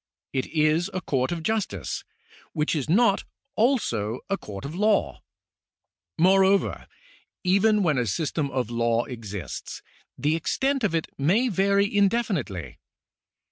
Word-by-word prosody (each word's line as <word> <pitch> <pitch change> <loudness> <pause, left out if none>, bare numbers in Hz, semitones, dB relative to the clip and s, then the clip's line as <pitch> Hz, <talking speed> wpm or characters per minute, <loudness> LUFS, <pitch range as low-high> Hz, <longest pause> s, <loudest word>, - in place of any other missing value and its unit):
It 130 -1 -1
is 155 +3 +2
a 185 - -1
court 130 -5 -1
of 170 -2 -3
justice, 160 - -2 0.5
which 150 +2 0
is 150 -1 -2
not 200 +2 +4 0.3
also 125 - +1
a - - +3
court 100 - -8
of 145 - -5
law. 175 - +1 1.0
Moreover, 190 +2 +3 0.6
even 200 +3 +3
when 155 -7 +2
a 120 - 0
system 150 - -1
of 125 -4 -2
law 115 0 +1
exists, 105 - -7 0.3
the 150 +2 +1
extent 270 - 0
of 195 -6 +1
it 165 - 0
may 200 - +3
vary 200 0 +3
indefinitely. 195 - 0
165 Hz, 130 wpm, -25 LUFS, 125-200 Hz, 1.0 s, not